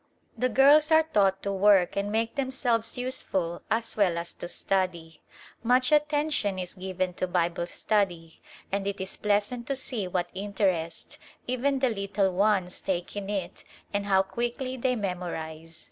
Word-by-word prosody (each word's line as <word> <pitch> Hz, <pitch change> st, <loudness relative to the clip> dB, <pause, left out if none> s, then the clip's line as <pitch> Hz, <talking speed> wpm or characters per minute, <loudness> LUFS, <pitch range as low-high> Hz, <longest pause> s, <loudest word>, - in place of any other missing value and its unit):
The 255 Hz, -, +1 dB
girls 290 Hz, +5 st, +6 dB
are 320 Hz, 0 st, +7 dB
taught 195 Hz, -10 st, +2 dB
to 200 Hz, -, -1 dB
work 195 Hz, -2 st, +4 dB
and 200 Hz, +1 st, -1 dB
make 225 Hz, +1 st, 0 dB
themselves 255 Hz, -5 st, -1 dB
useful 190 Hz, -9 st, -2 dB
as 230 Hz, +1 st, -1 dB
well 185 Hz, -5 st, +2 dB
as 170 Hz, 0 st, -3 dB
to -, -, -7 dB
study. 175 Hz, -4 st, -2 dB, 0.4 s
Much 250 Hz, +4 st, +3 dB
attention 295 Hz, -8 st, +2 dB
is 180 Hz, -1 st, -4 dB
given 185 Hz, -1 st, -3 dB
to 185 Hz, -, -2 dB
Bible 175 Hz, -1 st, 0 dB
study 175 Hz, -5 st, -1 dB, 0.3 s
and 200 Hz, 0 st, -1 dB
it 200 Hz, 0 st, -3 dB
is 190 Hz, 0 st, -3 dB
pleasant 210 Hz, +4 st, 0 dB
to 275 Hz, -, -1 dB
see 245 Hz, -7 st, -3 dB
what 175 Hz, -1 st, -2 dB
interest 190 Hz, -4 st, -2 dB, 0.3 s
even 260 Hz, +3 st, 0 dB
the 260 Hz, -1 st, +2 dB
little 200 Hz, -2 st, 0 dB
ones 190 Hz, -1 st, +1 dB
take 180 Hz, 0 st, -3 dB
in 200 Hz, -1 st, -4 dB
it 195 Hz, -4 st, -4 dB, 0.3 s
and 205 Hz, 0 st, -1 dB
how 190 Hz, -1 st, +4 dB
quickly 240 Hz, +6 st, -3 dB
they 250 Hz, 0 st, 0 dB
memorize. 165 Hz, -5 st, -5 dB
200 Hz, 160 wpm, -27 LUFS, 180-240 Hz, 0.4 s, are